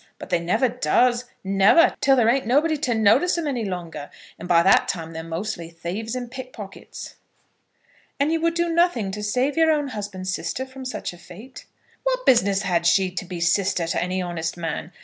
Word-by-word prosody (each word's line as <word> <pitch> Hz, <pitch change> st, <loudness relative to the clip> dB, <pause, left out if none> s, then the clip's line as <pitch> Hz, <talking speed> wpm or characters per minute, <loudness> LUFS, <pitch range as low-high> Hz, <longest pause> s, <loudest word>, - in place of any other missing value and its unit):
But -, -, -10 dB
they 175 Hz, -, +3 dB
never 200 Hz, +10 st, +1 dB
does, 245 Hz, 0 st, +1 dB, 0.2 s
never, 195 Hz, -, +4 dB
till 270 Hz, 0 st, +5 dB
there 240 Hz, -4 st, +3 dB
ain't 260 Hz, +1 st, +2 dB
nobody 300 Hz, +6 st, +3 dB
to 265 Hz, -5 st, -1 dB
notice 220 Hz, -, +3 dB
'em 335 Hz, -, -2 dB
any 260 Hz, -6 st, -2 dB
longer; 170 Hz, -7 st, -6 dB, 0.3 s
and 175 Hz, -, -7 dB
by 170 Hz, -1 st, +4 dB
that 195 Hz, -, +4 dB
time 165 Hz, -3 st, -4 dB
they're 160 Hz, -, -5 dB
mostly 165 Hz, +1 st, -5 dB
thieves 180 Hz, +8 st, -5 dB
and 245 Hz, -2 st, -5 dB
pickpockets." 255 Hz, -6 st, -9 dB, 1.0 s
"And 285 Hz, +3 st, +2 dB
you 325 Hz, 0 st, 0 dB
would 335 Hz, 0 st, +1 dB
do 345 Hz, 0 st, +1 dB
nothing 325 Hz, -, +1 dB
to 210 Hz, +2 st, -5 dB
save 250 Hz, +7 st, 0 dB
your 325 Hz, -1 st, +4 dB
own 295 Hz, -3 st, +1 dB
husband's 195 Hz, -4 st, -5 dB
sister 260 Hz, +6 st, -3 dB
from 260 Hz, 0 st, -10 dB
such 255 Hz, -, -5 dB
a 175 Hz, -, -14 dB
fate?" 215 Hz, +10 st, -13 dB, 0.3 s
"What -, -, -1 dB
business 200 Hz, -5 st, +3 dB
had 170 Hz, -2 st, +1 dB
she 190 Hz, +1 st, +3 dB
to 185 Hz, 0 st, -5 dB
be 180 Hz, -1 st, -6 dB
sister 180 Hz, +1 st, +1 dB
to 165 Hz, -, -1 dB
any 185 Hz, +1 st, -2 dB
honest 170 Hz, -1 st, -4 dB
man? 165 Hz, 0 st, -4 dB
210 Hz, 195 wpm, -23 LUFS, 180-260 Hz, 1.0 s, till